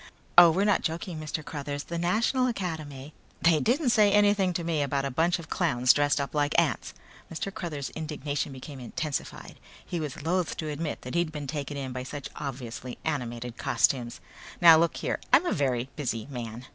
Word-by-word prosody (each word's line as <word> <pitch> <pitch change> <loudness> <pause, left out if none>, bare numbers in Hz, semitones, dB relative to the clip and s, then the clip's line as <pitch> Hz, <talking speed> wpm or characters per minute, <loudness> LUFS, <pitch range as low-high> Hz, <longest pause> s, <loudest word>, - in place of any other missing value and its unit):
"Oh, 175 0 +10
we're 190 +5 +2
not 205 -2 +3
joking, 165 +1 -3
Mr. 155 0 -4
Cruthers. 145 -1 -4
The 170 0 -4
National 230 +9 +2
Academy 155 - -4 0.2
" - - -32
"They 165 -2 +5
didn't 250 - +2
say 210 -3 +5
anything 205 -2 +4
to 170 - -2
me 165 -3 0
about 140 -1 0
a 135 - -2
bunch 165 +7 +2
of 170 - -10
clowns 125 -8 +3
dressed 145 0 +2
up 140 - -3
like 145 -1 +2
ants!" - - -1 0.4
Mr. 180 +4 -4
Cruthers' 165 -9 -5
indignation 150 -2 -3
became 135 +1 -9
intensified. 140 +4 -5 0.3
He 175 - -3
was 150 -2 -5
loathe 180 +2 0
to 155 - -3
admit 150 +1 -4
that 125 - -6
he'd 170 -2 +1
been 150 -2 -5
taken 145 0 -4
in 135 -2 -4
by 130 - -4
such 135 +1 -6
obviously 125 -3 -6
animated 120 -5 -3
costumes. 125 -1 +1 0.4
"Now 170 -2 +9
look 170 0 +1
here, - - -2
I'm - - +6
a - - +1
very 130 -4 0
busy 120 -7 -3
man." 120 -1 -6
150 Hz, 190 wpm, -28 LUFS, 135-170 Hz, 0.4 s, Oh